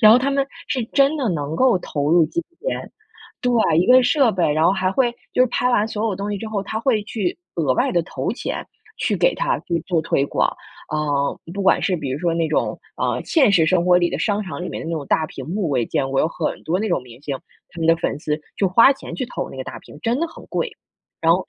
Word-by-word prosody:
然 215 0 +9
后 245 - +7
他 275 +2 0
们 275 0 +1 0.2
是 255 -4 -1
真 280 +4 +3
的 260 -6 0
能 150 -1 -3
够 255 -7 +4
投 145 -3 -2
入 170 -2 +5
金 340 - -2 0.2
钱 - - -4 0.5
对， 235 -9 +2
一 180 - +3
个 255 +1 +7
设 270 -2 +4
备， 175 -5 +1
然 155 +2 +2
后 - - +5
还 190 -1 0
会 245 0 +2 0.2
就 - - +1
是 - - +4
拍 250 +1 +1
完 220 -3 +2
所 215 0 -3
有 205 - 0
东 200 +1 -3
西 205 - -1
之 220 - -6
后， 205 -2 -2
他 215 +2 -4
会 230 -5 +2
去 205 -5 -2 0.2
额 150 -6 +1
外 - - +1
地 175 -1 +2
投 - - -3
钱 - - -4 0.3
去 - - 0
给 - - +3
他 - - 0
去 170 -1 -2
做 170 -4 +1
推 140 -3 +1
广， - - 0 0.4
呃， 145 -2 0
不 200 - -2
管 190 - +4
是 185 -2 +1
比 140 -4 -4
如 135 - -2
说 170 -1 0
那 165 -1 +1
种， 155 - 0 0.2
呃， - - 0
现 280 -9 +4
实 175 -5 +4
生 175 +1 +3
活 180 0 +5
里 175 -1 +2
的 - - -3
商 210 -1 0
场 180 -2 -6
里 - - -4
面 - - -5
的 - - -5
那 - - -1
种 150 -3 -4
大 160 - +2
屏 135 -5 -9
幕， 185 -3 -1
我 130 - +1
也 115 - 0
见 135 -1 -1
过 135 - +2
有 160 - +2
很 - - -3
多 175 +4 0
那 220 - -1
种 175 -9 0
明 120 -1 -14
星， 140 -2 -3 0.4
他 170 - -12
们 165 - 0
的 165 0 +5
粉 165 - -2
丝 150 0 -2 0.2
就 195 - +3
花 230 +9 +6
钱 270 - -9
去 255 - -2
投 - - -4
那 - - -10
个 130 - -5
大 - - -7
屏， - - -14
真 240 +5 0
的 335 - +1
很 - - -13
贵， 485 - -1 0.5
然 165 0 +5
后 185 +2 -1
185 Hz, 290 characters per minute, -21 LUFS, 160-235 Hz, 0.5 s, 然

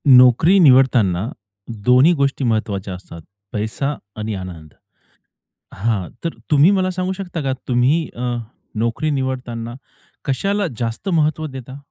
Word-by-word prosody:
नोकरी 125 +8 +7
निवडतांना 125 - +4 0.6
दोन्ही 130 +6 +6
गोष्टी 140 0 +1
महत्वाच्या 105 -5 -1
असतात. 90 -2 -10 0.3
पैसा 110 +7 -2 0.2
आणि 110 0 -3
आनंद, 85 -5 -8 1.0
हां, 105 -3 -1 0.2
तर 165 - -2 0.2
तुम्ही 150 +5 +6
मला 190 -2 +2
सांगू 185 0 -2
शकता 185 -4 -5
का 135 -1 0
तुम्ही 135 +6 +2
अ, 120 0 -2 0.4
नोकरी 115 +8 -1
निवडताना 125 -4 -3 0.5
कशाला 200 +8 0
जास्त 115 - -3
महत्व 155 -2 +1
देता? 130 -1 -9
130 Hz, 120 wpm, -20 LUFS, 110-155 Hz, 1.0 s, नोकरी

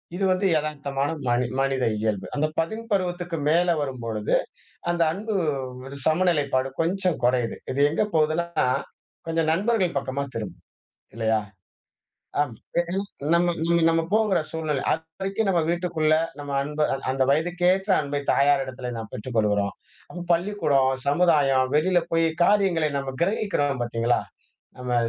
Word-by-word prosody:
இது 195 - -2
வந்து 185 +2 +1
எதார்த்தமான 145 -2 -2 0.2
மனி 120 +1 +2
மனித 135 -1 +1
இயல்பு. 105 -3 -1
அந்த 150 +1 +1
பதின் 220 +8 -2
பருவத்துக்கு 175 -3 -1
மேல 175 +2 +3
வரும்பொழுது, 115 -6 -2 0.6
அந்த 170 -1 +1
அன்பு 215 +3 -4 0.5
ஒரு 140 +1 -8
சமநிலைப்பாடு 150 -6 +2
கொஞ்சம் 180 +1 0
கொறையுது. 125 -2 +1 0.2
இது 140 - -2
எங்க 160 - +1
போகுதுன்னா, 160 0 +1 0.6
கொஞ்சம் 165 -1 0
நண்பர்கள் 190 -3 +1
பக்கமா 135 +1 -3
திரும்புது, 110 -2 -4 0.6
இல்லையா? 110 -1 +1 1.0
ஆமா. 125 -6 -2 0.2
ஏன்னா, 175 +3 -1 0.3
நம்ம 175 0 +2
நம்ம 170 0 +3
நம்ம 165 0 +2
போகற 215 -4 +3
சூழ்நில. 155 -4 -2
அதுவரைக்கும் 195 +6 -3
நம்ம 175 -3 +3
வீட்டுக்குள்ள, 170 -3 +1 0.3
நம்ம 145 -1 -6
அன்ப 150 +1 -6
அந் 135 - -5
அந்த 130 0 +1
வயதுக்கேற்ற 180 +5 +1
அன்பை 145 0 -3
தாயாரிடத்துல 135 -3 +1
நாம் 110 -1 -7
பெற்றுக்கொள்ளுகிறோம். 105 -3 0 0.3
அப்ப 175 -1 -7
பள்ளிக்கூடம், 165 -7 +2 0.2
சமுதாயம், 140 -5 +3
வெளில 175 +4 +3
போய் 165 0 +3 0.2
காரியங்களை 180 -6 +3
நம்ம 135 -1 -4
கிரகிக்கிறோம் 170 - 0
பாத்தீங்களா? 120 0 0 0.6
நம்ம 125 -1 -2
155 Hz, 130 wpm, -25 LUFS, 130-175 Hz, 1.0 s, மேல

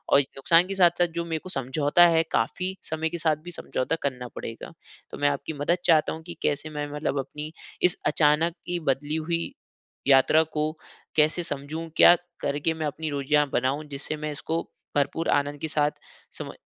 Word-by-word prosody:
और 140 - +8
नुकसान 140 +5 +3
के 195 - -2
साथ-साथ 175 -2 +4
जो 170 - -1
मेरे 165 -1 -2
को 185 - -7
समझौता 145 +5 +3
है 165 -1 +4
काफ़ी 185 +11 0
समय 160 0 -2
के 170 +1 -5
साथ 160 -2 +2
भी 175 - -6
समझौता 160 -2 -2
करना 125 -3 -3
पड़ेगा। 115 +7 -7 0.4
तो - - -8
मैं 145 0 +3
आपकी 140 +2 -3
मदद 170 +5 +1
चाहता 155 -2 +4
हूँ 160 - -7
कि 175 - -6
कैसे 150 +2 -1
मैं 150 -1 -3
मतलब 150 -1 -2
अपनी 150 +3 -5 0.3
इस 180 - +4
अचानक 155 +2 +3
की 175 0 -1
बदली 145 +3 0
हुई 165 +1 -2 0.6
यात्रा 140 +3 +6 0.2
को 155 +1 +1 0.5
कैसे 155 +3 +3
समझूँ? 155 +2 -5
क्या 175 - +9 0.3
करके 145 +3 0
मैं 160 -1 -3
अपनी 155 +2 -3
रोज़ियाँ 145 +1 +2
बनाऊँ? 135 +5 0
जिससे 140 +2 -4
मैं 150 0 -4
इसको 160 +3 -2 0.3
भरपूर 145 +3 0
आनंद 145 0 -3
के 160 - -3
साथ, 150 -1 +2 0.4
समय - - -8
155 Hz, 185 wpm, -26 LUFS, 145-165 Hz, 0.6 s, क्या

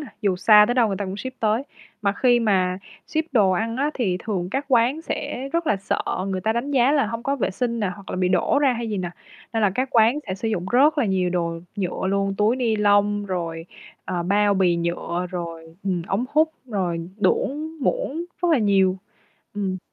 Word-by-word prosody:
nà, 295 - -7
dù 195 -3 +2
xa 210 +3 +7
tới 245 - +1
đâu 245 -2 +4
người 195 - -2
ta 200 - -3
cũng 190 0 -5
ship 260 +4 -7
tới. 220 +3 +1 0.4
Mà 200 -1 +2
khi 240 +3 +3
mà 185 -4 +1 0.3
ship 315 0 -1
đồ 210 -7 +4
ăn 225 +5 -1
á 285 +3 +1
thì 195 -8 0
thường 185 -5 -2
các 270 +6 -1
quán 255 +4 +2
sẽ 270 -4 -4
rất 335 0 0
là 215 - +2
sợ 195 - -2 0.3
người 190 -1 -2
ta 220 +4 +1
đánh 240 +5 -2
giá 265 -1 +3
là 285 -5 +3
hông 230 +2 -5
có 275 +3 -1
vệ 235 - -1
sinh 235 +4 -2
nà 200 -3 0
hoặc 200 -2 -11
là - - -3
bị 185 0 +1
đổ 185 +9 +2
ra 280 -3 +3
hay 235 -1 -4
gì 210 - -2
nà, 180 -2 -3 0.4
nên 225 -1 0
là 205 - +4
các 255 +3 0
quán 230 +2 +4
sẽ 190 - -3
sử 210 +4 -3
dụng 185 -5 -2
rất 290 +5 +4
là 285 - +3
nhiều 190 -3 +1
đồ 170 -2 -1 0.2
nhựa 190 -1 -2
luôn, 195 0 0
túi 215 +4 +3
ni 235 -4 +1
lông 205 0 +3
rồi, 165 -3 -4 0.4
ờ, 175 -1 -2
bao 205 +3 +2
bì 185 -3 +3
nhựa 170 +1 -2
rồi, 165 -2 -6
ừm, 185 -3 -1
ống 200 +6 0
hút, 315 +1 +3 0.2
rồi 175 -7 -2
đũa 295 +8 +1
muỗng 340 - -1 0.2
rất 350 - +3
là 315 - +4
nhiều. 195 -3 +3 0.6
Ừm. 195 -2 -2
210 Hz, 225 wpm, -23 LUFS, 185-245 Hz, 0.6 s, xa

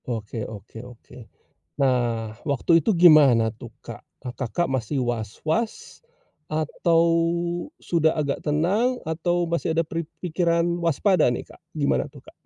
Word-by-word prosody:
Oke 110 -1 -4
oke 110 +1 -10
oke. 125 0 -14 0.6
Nah 120 -4 0
waktu 155 +4 +2
itu 225 - +3
gimana 150 - +6
tuh 115 -1 -11
Kak? - - -10 0.3
Kakak 130 +7 -2
masih 130 +1 -1
was-was, 125 - -3 0.5
atau 165 +2 +1 0.8
sudah 160 -2 +1
agak 145 -3 -1
tenang 195 +12 +1
atau 175 +2 0
masih 170 -1 -1
ada 165 - +2
pri 165 +1 -4 0.2
pikiran 170 -1 +1 0.2
waspada 180 +4 +3
nih 120 - -6
Kak? - - -16
Gimana 145 -3 0
tuh - - -13
Kak? - - -17
155 Hz, 130 wpm, -24 LUFS, 120-170 Hz, 0.8 s, gimana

